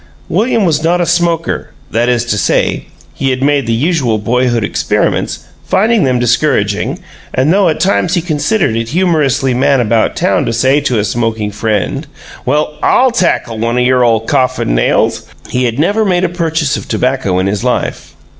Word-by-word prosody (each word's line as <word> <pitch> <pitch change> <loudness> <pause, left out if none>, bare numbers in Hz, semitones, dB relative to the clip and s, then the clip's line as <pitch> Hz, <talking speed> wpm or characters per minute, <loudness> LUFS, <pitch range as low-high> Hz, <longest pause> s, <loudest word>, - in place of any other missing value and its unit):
William 225 -2 +1
was 155 -2 +1
not 175 +2 +2
a 175 - +1
smoker 170 -1 0 0.2
that 120 +2 +1
is 120 -1 +1
to 120 - -1
say, 90 -7 0 0.3
he 135 - -1
had 130 0 -1
made 140 -3 +1
the - - 0
usual 130 -2 +1
boyhood 120 +1 0
experiments, - - -1 0.2
finding 215 -1 +2
them 130 -1 +1
discouraging; 120 -4 0 0.4
and 135 +6 +2
though 195 -2 +3
at 155 - -2
times 180 0 +1
he 175 - +1
considered 155 - 0
it 115 0 -2
humorously 150 -6 +1
man 135 +2 +2
about 115 -1 +1
town - - +1
to - - -2
say 130 +5 +2
to 125 -5 0
a 105 - +1
smoking 110 -1 -2
friend, 105 -1 -2 0.4
"Well, 150 0 0
I'll 260 0 +3
tackle 170 - 0
one 115 +2 -1
o' - - +2
your 125 0 +3
ole 115 -2 +2
coffin 120 - 0
nails," - - +1 0.2
he 125 0 0
had 120 0 -2
never 200 +9 +1
made 185 -3 +1
a 185 - +1
purchase 160 -4 -1
of - - -6
tobacco 125 -8 0
in 95 - 0
his 100 0 -2
life. - - -2
130 Hz, 185 wpm, -13 LUFS, 115-165 Hz, 0.4 s, though